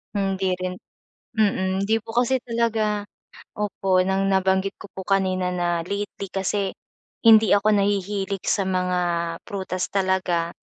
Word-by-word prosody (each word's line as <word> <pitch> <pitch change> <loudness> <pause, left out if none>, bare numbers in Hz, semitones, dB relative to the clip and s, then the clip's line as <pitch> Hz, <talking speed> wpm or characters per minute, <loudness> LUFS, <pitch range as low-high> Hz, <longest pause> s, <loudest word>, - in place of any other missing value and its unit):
Hindi 195 -2 0
rin 185 0 -3 0.6
mm. 195 -3 +1
Hindi 220 +3 +2
po 225 - -8
kasi 245 +2 +2
talaga. 225 -3 0 0.5
Opo, 195 -3 +1
nang 190 +1 +1
nabanggit 190 0 +2
ko - - -9
po 190 - -5
kanina 185 -2 +1
na 175 -1 0
lately 200 0 -4
kasi, 195 0 -1 0.5
hindi 220 -2 +7
ako 205 +1 +3
nahihilig 200 -1 -1
sa 195 - +1
mga 180 -1 0 0.5
prutas 190 -3 -3
talaga. 185 -3 +1
195 Hz, 130 wpm, -23 LUFS, 185-205 Hz, 0.6 s, hindi